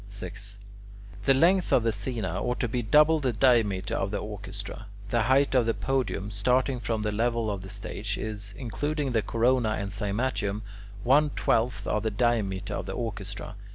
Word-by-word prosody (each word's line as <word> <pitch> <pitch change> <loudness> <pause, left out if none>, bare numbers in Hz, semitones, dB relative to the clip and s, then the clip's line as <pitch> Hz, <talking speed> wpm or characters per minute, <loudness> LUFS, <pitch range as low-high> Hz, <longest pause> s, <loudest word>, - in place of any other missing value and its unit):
6. 100 0 -7 0.7
The 135 - +5
length 180 +6 +4
of 120 - +4
the 115 - +2
"scaena" 110 -1 -3
ought 125 0 -1
to 125 - +1
be 120 +2 -1
double 150 +7 +5
the 130 -4 0
diameter 105 -5 +2
of 95 - 0
the 105 - -2
orchestra. 100 0 -7 0.2
The 120 - +3
height 135 +2 +3
of 125 -3 +3
the 115 - +1
podium, 130 -6 -1
starting 125 +5 +1
from 110 -1 -2
the 105 - 0
level 115 0 0
of 100 -2 -4
the 95 - -9
stage, 100 0 -4
is, 105 -2 -5
including 145 +4 -2
the 115 -2 +2
corona 115 +1 +2
and 100 -2 -3
cymatium, 105 0 -1 0.4
one 145 +4 +5
twelfth 115 -5 0
of 105 - 0
the 110 - 0
diameter 105 -3 0
of - - -4
the - - -3
orchestra. 105 -3 -5
110 Hz, 180 wpm, -27 LUFS, 100-125 Hz, 0.7 s, The